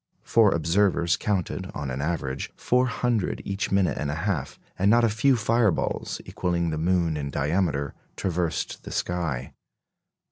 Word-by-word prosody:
Four 110 -4 +4
observers 85 +1 +2
counted, 100 -5 -2
on 70 -3 -3
an 65 +2 -3
average, 70 -4 -2
four 125 +1 +2
hundred 115 -3 0
each 100 0 -2
minute 95 -2 +2
and 75 - -2
a 75 - -2
half; 80 -6 -2 0.2
and 100 +2 +4
not 120 +2 +5
a 115 - +4
few 125 +5 +3
fireballs, 115 -3 +1
equalling 85 -2 -1
the 80 - -2
moon 85 -1 +1
in 70 -1 -3
diameter, 70 0 0 0.2
traversed 85 -3 -2
the - - -8
sky. 80 -8 -2
90 Hz, 150 wpm, -26 LUFS, 80-105 Hz, 0.2 s, not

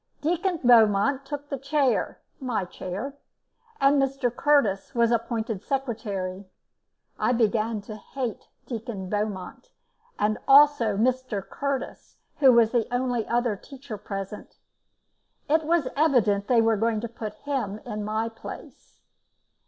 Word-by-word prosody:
Deacon 345 +2 0
Beaumont 230 +2 +5
took 290 0 -5
the 275 - -3
chair 275 -1 +1 0.2
my 245 -8 -2
chair 190 +9 -6 0.7
and 275 +1 +4
Mr 270 -3 -1
Curtis 250 -11 +2
was 235 0 +3
appointed 225 -3 -1
secretary. 205 -8 -3 0.7
I 245 - +2
began 225 -1 +1
to 210 +1 -9
hate 245 0 -5 0.2
Deacon 215 -6 -6
Beaumont, 210 - -4 0.5
as 215 +1 +1
also 275 -7 +6
Mr. 245 -3 0
Curtis, 280 -1 -4 0.2
who 270 -3 +7
was 230 -2 +5
the 240 -2 0
only 245 -2 -1
other 240 -2 +1
teacher 265 +2 -9
present; 195 0 -7 0.9
it 315 +1 +2
was 325 -4 +2
evident 230 -9 +2
they 240 -2 +4
were 225 -1 +3
going 225 +1 +1
to 235 - -3
put 215 -2 -7
him 245 -8 -3
in 215 -3 -4
my 215 +2 -1
place. 225 0 -11
235 Hz, 130 wpm, -26 LUFS, 210-270 Hz, 0.9 s, who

